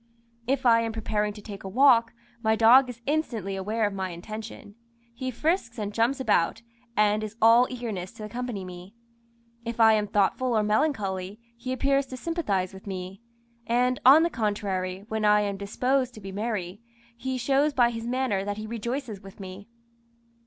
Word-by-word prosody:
If 265 0 0
I 230 -1 +6
am 225 -1 -2
preparing 210 -1 -1
to 210 -1 -12
take 200 -3 -9
a 190 - -5
walk, 235 0 +5 0.3
my 220 -1 +2
dog 245 +4 +6
is 235 -1 -9
instantly 235 - -1
aware 210 +4 -1
of 205 - -1
my 190 -1 -3
intention. 215 +4 -8 0.4
He 260 +2 -4
frisks 255 -1 -1
and 210 -2 -4
jumps 235 +5 +1
about, 225 -2 +1 0.3
and 210 0 +3
is 215 +1 -7
all 230 +3 +6
eagerness 220 -7 -5
to 225 - -10
accompany 220 -2 -5
me. 180 +3 -10 0.7
If 235 0 -5
I 220 -1 +7
am 210 -1 +1
thoughtful 220 +4 +1
or 215 - +2
melancholy, 210 -4 -1 0.2
he 235 +2 -6
appears 275 +1 +1
to 255 - -7
sympathise 215 - -2
with 190 +1 -12
me; 185 +1 -6 0.5
and, 250 +2 +2
on 280 +6 +8
the 340 - +1
contrary, 200 -4 -2
when 220 -1 -2
I 210 0 +5
am 200 -1 -2
disposed 250 +5 -1
to - - -9
be 195 -1 -8
merry, 205 -2 -4 0.3
he 260 +2 -3
shows 275 +4 +2
by 245 -4 +3
his 230 0 -5
manner 250 -6 0
that 205 +1 -4
he 215 - -5
rejoices 235 -1 -4
with 195 0 -13
me. 190 +1 -9
220 Hz, 180 wpm, -26 LUFS, 200-250 Hz, 0.7 s, on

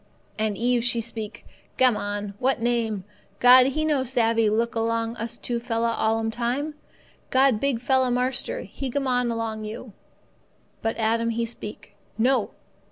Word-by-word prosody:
And 215 -2 0
Eve 240 0 +1
she 235 0 +2
speak, 225 -2 -5 0.3
'Gammon! 205 -4 +1
What 260 0 +1
name? 230 -4 0 0.4
God 250 +1 +8
He 310 +3 -1
no 295 -4 +2
savvee 230 -3 +2
look 230 +2 0
along 230 0 -1
us 230 +1 -5
two 240 -1 -2
fella 230 0 0
all 225 0 +1
'm 225 0 -1
time. 245 +7 -2 0.6
God 260 -4 +4
big 275 -2 0
fella 260 +1 +2
marster, 250 +1 -1
He 270 -2 -6
gammon 250 -2 0
along 225 -2 -3
you.' 220 +1 -8 0.9
But 225 - -1
Adam 230 +1 +1
he 230 0 -1
speak, 225 -2 -8 0.2
'No. 245 0 +2
235 Hz, 150 wpm, -25 LUFS, 225-250 Hz, 0.9 s, God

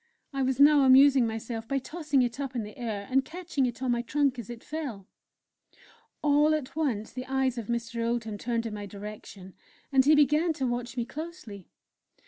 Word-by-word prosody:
I 275 - -1
was 265 0 0
now 290 0 +7
amusing 265 -1 +6
myself 225 0 -5
by 275 - 0
tossing 295 -1 0
it 240 +2 -3
up 270 -2 -4
in 235 - -1
the 210 0 -10
air, 215 -4 -4
and 265 +1 +3
catching 315 -4 -2
it 240 +1 -6
on 255 - +1
my 240 0 +1
trunk 275 +1 0
as 230 - -8
it 235 -1 -8
fell. 275 -11 -5 1.2
All 295 +1 +4
at 290 -3 -5
once 250 -9 -2
the 255 +1 -6
eyes 265 -2 0
of 220 - -7
Mr. 235 0 -2
Oldham 230 -3 -2
turned 235 0 -2
in 225 - -4
my 205 -1 -6
direction, 200 -2 -10 0.4
and 265 -1 +5
he 300 +3 +5
began 300 +3 +3
to 270 -3 -2
watch 240 0 -3
me 240 - -1
closely. 295 - -8
255 Hz, 195 wpm, -28 LUFS, 230-285 Hz, 1.2 s, now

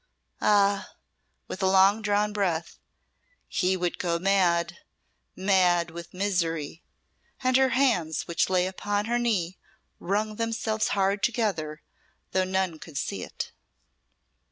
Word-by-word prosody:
Ah!" 200 -1 +2 0.5
with 190 - -6
a 190 - +3
long 195 +3 +5
drawn 210 0 +1
breath 175 -5 -2 0.7
"he 185 0 +1
would 175 -1 -2
go 170 -2 0
mad 180 -2 +2 0.6
mad 180 -3 +2
with 170 0 -9
misery;" 170 -5 -2 0.6
and 255 0 +2
her 265 0 +5
hands, 175 - +1
which 170 - +1
lay 180 -1 +2
upon 205 +2 -2
her 240 +1 0
knee, 195 -7 -1 0.4
wrung 210 +3 -1
themselves 225 -1 -1
hard 195 +1 +1
together, 190 -11 -1 0.5
though 185 - +2
none 185 -3 -1
could 155 -3 -9
see 100 -8 -3
it. - - -6
190 Hz, 125 wpm, -27 LUFS, 170-210 Hz, 0.7 s, long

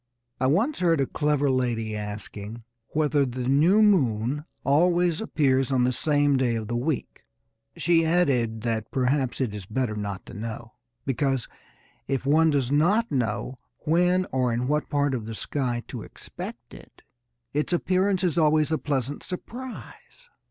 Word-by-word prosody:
I 130 - +2
once 215 - +1
heard 165 -4 +3
a 135 - +2
clever 145 0 0
lady 120 -4 0
asking 105 +1 -6 0.2
whether 150 -2 +1
the 125 -1 -3
new 165 +11 +5
moon 140 - +2 0.2
always 170 +4 +3
appears 135 - +1
on 130 -2 +3
the 125 - +2
same 145 +1 +2
day 125 -3 +1
of 110 -2 -3
the 120 - -2
week. 130 +2 -3 0.5
She 165 0 +3
added 135 -10 +1
that 115 -1 -2
perhaps 130 0 0
it 125 -6 -1
is 100 -3 -7
better 115 0 -1
not 100 -2 -5
to - - -11
know, 115 +2 -6 0.3
because, 135 -1 0 0.6
if 135 -1 -1
one 160 +3 +4
does 140 -4 +1
not 200 +11 +3
know 125 0 -2 0.3
when 180 +3 +3
or 130 -2 +1
in 120 +2 -1
what 150 +2 0
part 145 -2 +1
of 115 -4 -3
the 115 - -5
sky 120 -1 -2
to - - -6
expect - - -9
it, - - -15 0.5
its 150 +4 0
appearance 185 +2 +1
is 170 -2 +1
always 155 0 +3
a 160 - +1
pleasant 140 -1 -2
surprise. 255 - -8
140 Hz, 160 wpm, -26 LUFS, 120-160 Hz, 0.6 s, new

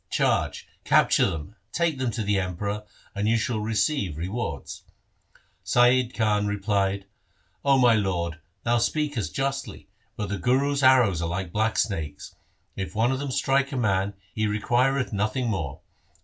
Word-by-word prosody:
Charge, - - 0 0.2
capture - - +4
them, 80 +6 -6 0.2
take 165 -5 0
them 130 -2 0
to 110 0 -3
the 100 -1 +1
Emperor, 100 +3 -3 0.3
and 105 +1 -1
you 115 +1 +3
shall 115 0 -1
receive 105 - 0
re 85 +3 -3
wards.' 100 - -5 0.8
Saiyid 125 0 +3
Ali 105 -2 +2
replied, 100 -1 0 0.3
' - - -41
O 140 -1 +4
my 125 -3 +5
lord, 90 -6 -1 0.2
thou 120 0 +2
speakest 145 -3 -1
justly, 135 0 -3 0.3
but 105 -2 -4
the 100 -1 -3
Guru's 140 +6 +1
arrows 125 -10 +5
are 85 - -1
like 90 0 -3
black 110 +3 0
snakes. 80 -8 -2 0.4
If 95 +1 -5
one 115 +4 +2
of 135 - -1
them 140 0 -3
strike 135 +1 +1
a 135 - -3
man, 100 -3 0 0.2
he 110 0 0
requireth 125 +5 +1
nothing 110 +5 0
more. 80 -9 -4
110 Hz, 160 wpm, -25 LUFS, 95-130 Hz, 0.8 s, my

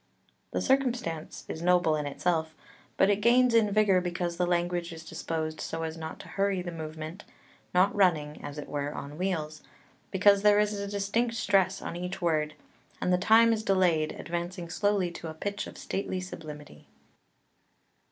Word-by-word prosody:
The - - -2
circumstance 245 - -1
is 160 - -5
noble 175 -2 +3
in 150 -1 -2
itself, 160 +2 -1 0.4
but 195 - +5
it 205 0 0
gains 245 +2 +5
in 225 -2 +4
vigour 200 -3 +4
because 175 -1 -3
the 180 0 +1
language 175 0 0
is 165 -1 -9
disposed 155 -1 -3
so 165 0 -4
as 160 0 -3
not 160 -1 -7
to - - -13
hurry 195 -2 0
the 175 - -5
movement, 160 +3 -7 0.5
not 185 +2 +4
running, 160 -7 +1
as 145 - -7
it 150 - -6
were, 145 0 -3
on 145 +3 -7
wheels, 155 -5 -2 0.5
because 200 +1 +5
there 205 0 +5
is 210 0 +2
a 200 - -3
distinct 205 +4 0
stress 195 -3 +2
on - - -5
each 180 +2 -4
word, 155 -3 0 0.4
and 180 - +1
the - - +4
time 225 +4 +6
is 220 - -1
delayed, 180 -6 +2
advancing 175 0 -5
slowly 200 -1 +1
to 170 - -7
a 160 - -8
pitch 200 +5 -4
of - - -11
stately 190 -1 -3
sublimity. 155 -5 -9
180 Hz, 170 wpm, -29 LUFS, 160-200 Hz, 0.5 s, time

